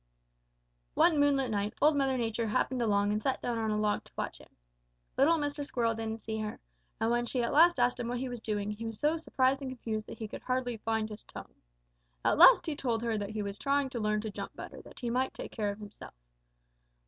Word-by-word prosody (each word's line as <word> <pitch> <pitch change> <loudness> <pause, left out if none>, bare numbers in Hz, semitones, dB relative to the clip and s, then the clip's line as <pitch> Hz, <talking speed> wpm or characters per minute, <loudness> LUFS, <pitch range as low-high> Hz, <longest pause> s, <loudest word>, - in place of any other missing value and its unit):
"One 320 -4 +4
moonlight 275 -4 +3
night, 205 0 -1
Old 300 +1 +5
Mother 270 -2 +1
Nature 230 -1 -1
happened 255 +3 0
along 205 -2 +2
and 210 +1 0
sat 265 +3 0
down 235 -2 -2
on 220 -1 0
a 210 - 0
log 210 -1 0
to - - -16
watch - - -4
him. - - -16 0.7
Little 315 +5 +4
Mr. 290 -1 -2
Squirrel 235 -5 0
didn't 225 0 -5
see 220 0 -3
her, 215 -1 -4 0.4
and 225 +1 +1
when 240 0 +1
at 240 0 -1
last 335 +4 +7
she - - +1
asked 245 +1 +1
him 240 - -2
what 245 +1 -2
he 260 +2 -3
was 245 -1 -5
doing, 210 -2 -2
he 220 +2 -5
was 225 -2 -7
so 300 +2 +2
surprised 270 -4 +1
and 270 - -4
confused 225 -4 -4
that - - -8
he 220 - -5
could - - -8
hardly 255 -2 -1
find 220 0 -1
his 210 0 -8
tongue. - - -11 0.7
At - - +3
last - - +9
he 315 - -2
told 235 -5 -1
her 230 -1 0
that 205 -1 -3
he 215 -1 -3
was 200 0 -5
trying 280 -1 +1
to 245 - -3
learn 210 -1 +1
to 220 -1 -5
jump - - -7
better - - -8
that - - -14
he 240 -2 -2
might 255 +2 0
better - - -7
take - - -9
care 210 -3 -1
of 200 - -4
himself. 210 - -11
235 Hz, 245 wpm, -31 LUFS, 215-265 Hz, 0.7 s, last